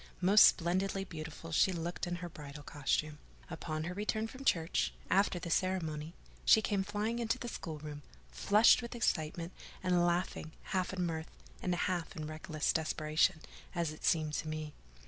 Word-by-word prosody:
Most 195 +4 +8
splendidly 190 +3 +2
beautiful 165 -2 -8
she 175 +4 +4
looked 175 0 -3
in 175 - -2
her - - -3
bridal 150 -2 -9
costume. 150 +1 -1 0.3
Upon 155 0 -3
her 175 +3 -3
return 215 +2 -1
from 255 +4 -10
church, 165 -9 +1 0.2
after 195 -1 +3
the 175 -1 -5
ceremony, 165 -4 -1 0.3
she - - +7
came 205 -2 0
flying 210 +4 -2
into 230 +1 0
the 255 - -6
schoolroom, 150 -8 -6 0.3
flushed 205 - +5
with 235 0 -6
excitement, 170 -5 -1 0.3
and 180 -1 +3
laughing, 175 -2 -1 0.2
half 185 -1 +1
in 185 -2 -1
mirth, 160 -1 -3 0.3
and 180 -1 0
half 175 0 -1
in 155 -3 -4
reckless 155 0 -1
desperation, 155 0 +1 0.3
as 170 -3 0
it 155 - -11
seemed 155 -3 +2
to 155 - -2
me. 155 -1 -4
170 Hz, 165 wpm, -33 LUFS, 155-190 Hz, 0.3 s, Most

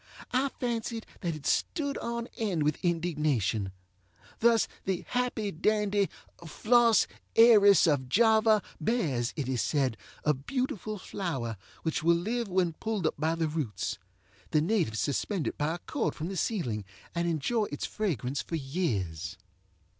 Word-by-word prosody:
I 265 +2 +2
fancied 230 -2 -2
that 170 -3 -2
it 150 - -10
stood 285 -4 0
on 235 0 -3
end 190 -9 0
with 150 0 0
indignation. 150 - 0 0.7
Thus 230 -1 +4 0.2
the 190 -2 -1
happy 245 -4 -1
dandy 205 +2 +1 0.3
Flos 230 +6 +4 0.3
Aeris 210 -5 +8
of 140 -6 +1
Java 220 - +4 0.2
bears, 150 - 0
it 140 -4 -3
is 130 -3 0
said, 135 -7 +1 0.3
a 150 - +3
beautiful 215 - -3
flower, 135 - -3 0.3
which 160 - -1
will 170 +2 +4
live 225 +7 -1
when 180 -3 +1
pulled 215 +1 -3
up - - +2
by 160 +2 +1
the 165 -1 0
roots. 150 -9 -3 0.5
The 155 - +3
natives 165 - +1
suspend 165 +5 -1
it - - -2
by 155 +3 -1
a - - -5
cord - - -2
from 160 +3 -4
the 195 - -4
ceiling 145 - -1 0.3
and 170 0 0
enjoy 170 - +1
its 145 -7 -4
fragrance 140 - -2
for 165 - -5
years. 100 - -2
170 Hz, 145 wpm, -29 LUFS, 145-220 Hz, 0.7 s, Aeris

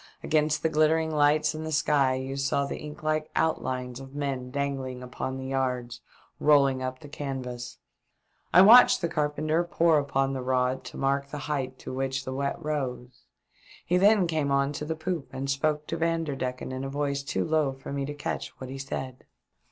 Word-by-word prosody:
Against 155 0 +1
the - - +4
glittering 160 +1 +2
lights 150 +1 +3
in 155 0 -5
the 160 - -4
sky 140 -3 +2
you 130 +1 -4
saw 140 +1 0
the - - -5
ink 150 -1 -9
like 155 0 0
outlines 130 -6 -1
of 135 +1 -11
men 135 -3 -3
dangling 135 -2 -3
upon 130 +1 -4
the 130 - -6
yards, 125 -2 -2 0.4
rolling 140 -3 +4
up 130 0 -4
the 150 - -10
canvas. 130 -4 -5 0.7
I 185 - +8
watched 245 +3 +8
the 170 - +1
carpenter 155 +1 0
pore 170 -2 +3
upon 135 -1 0
the 130 - -3
rod 130 0 0
to - - -8
mark 140 +1 0
the 150 - -5
height 130 -3 -2
to - - -8
which 135 0 -2
the 130 - -4
wet 140 +1 -1
rose; 135 -6 -4 0.6
he 180 - +2
then 200 0 +5
came 155 -4 0
on 140 +1 +1
to 150 - -4
the 160 +1 -2
poop 160 -1 -3
and 135 +1 -4
spoke 150 +2 0
to 165 - -3
Vanderdecken 150 -7 -2
in 130 +1 -4
a 135 - -3
voice 140 0 -1
too 140 - -2
low 155 -3 +2
for 135 +1 -8
me 140 0 -2
to 145 - -5
catch 145 - -4
what 130 0 -7
he 135 - -6
said. 130 -1 -5
140 Hz, 190 wpm, -27 LUFS, 130-155 Hz, 0.7 s, I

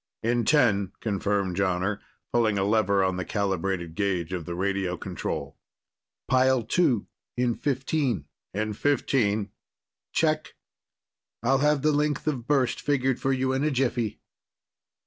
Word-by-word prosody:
"In 120 0 +1
ten," 105 -9 +3
confirmed 100 -3 -1
Jonner, 95 +1 0 0.3
pulling 110 -4 +2
a 95 - +1
lever 100 -2 +3
on 95 -1 0
the 95 - -2
calibrated 95 -4 -2
gauge 95 -3 -1
of 90 -3 -3
the 85 - -4
radio 95 -1 -1
control. 70 -3 -5 0.7
"Pile 130 -1 +3
Two, 120 - +2 0.3
in 125 -1 +2
fifteen." 135 - -1 0.3
"In 105 +2 -2
fifteen." 110 -5 +1 0.6
"Check. 155 -1 0 0.9
I'll 135 +3 +3
have 150 -1 +2
the 155 - +4
length 150 -1 0
of 130 -6 -2
burst 135 -4 +1
figured 135 -3 +1
for 135 - 0
you 130 0 +1
in 135 +2 0
a 155 - +2
jiffy." 125 -5 -1
110 Hz, 135 wpm, -26 LUFS, 95-135 Hz, 0.9 s, the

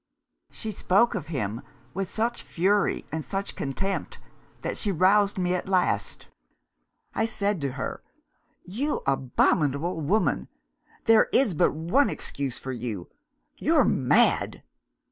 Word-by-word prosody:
She 220 - -6
spoke 205 +4 +2
of 180 -9 -4
him, 115 -8 -3 0.3
with 195 +1 -3
such 235 +2 -1
fury 200 +4 +1
and 160 0 -3
such 195 +9 -4
contempt, 195 +9 -3 0.5
that - - -2
she 205 - -2
roused 195 +3 +3
me 180 -1 +1
at 180 +1 -3
last. 185 -2 0 0.9
I 220 - +1
said 205 -5 -1
to 140 -2 -2
her, 135 - -4 0.6
'You 250 - -2
abominable 140 +4 +1
woman, 195 +9 +1 0.6
there 225 -1 +5
is 250 -8 +3
but 155 - +2
one 175 - +2
excuse 135 -3 -4
for 130 - -6
you 115 -7 -5 0.5
you're - - +4
mad! - - +2
180 Hz, 125 wpm, -26 LUFS, 140-205 Hz, 0.9 s, there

